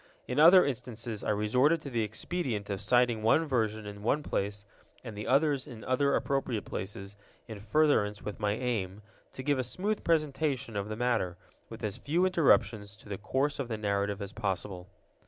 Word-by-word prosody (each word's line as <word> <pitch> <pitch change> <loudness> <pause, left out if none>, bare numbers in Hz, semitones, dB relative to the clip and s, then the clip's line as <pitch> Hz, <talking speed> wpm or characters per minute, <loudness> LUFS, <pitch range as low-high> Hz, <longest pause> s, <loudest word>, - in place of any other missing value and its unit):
In 125 - -1
other 175 +4 +8
instances 115 -4 -4
I - - -2
resorted 125 +10 +3
to 140 - -7
the 115 -2 0
expedient 110 - -3
of 100 - -3
citing 120 -3 +3
one 115 +9 +3
version 110 -6 -1
in 100 0 -8
one 140 +8 +1
place 100 -3 -3 0.4
and 110 -4 -7
the 105 - -6
others 140 0 +2
in 120 -6 -10
other 140 +2 +2
appropriate 130 -6 -1
places, 100 +1 -6 0.3
in 110 -3 -7
furtherance 105 -3 +2
of 105 -1 -7
my 105 -1 +1
aim, 105 -5 -3 0.3
to 130 - -6
give 145 -1 +1
a - - +1
smooth 200 - -2
presentation 145 -6 0
of 100 +1 -2
the 110 - -3
matter, 115 -7 0 0.3
with - - -10
as 105 +2 -3
few 165 +8 +1
interruptions 110 - +2
to 105 - -16
the 100 -2 -4
course 135 +8 -1
of 135 - -2
the 110 -2 -3
narrative 100 -1 -1
as 100 +1 -8
possible. 95 -3 -3
115 Hz, 185 wpm, -30 LUFS, 105-140 Hz, 0.4 s, other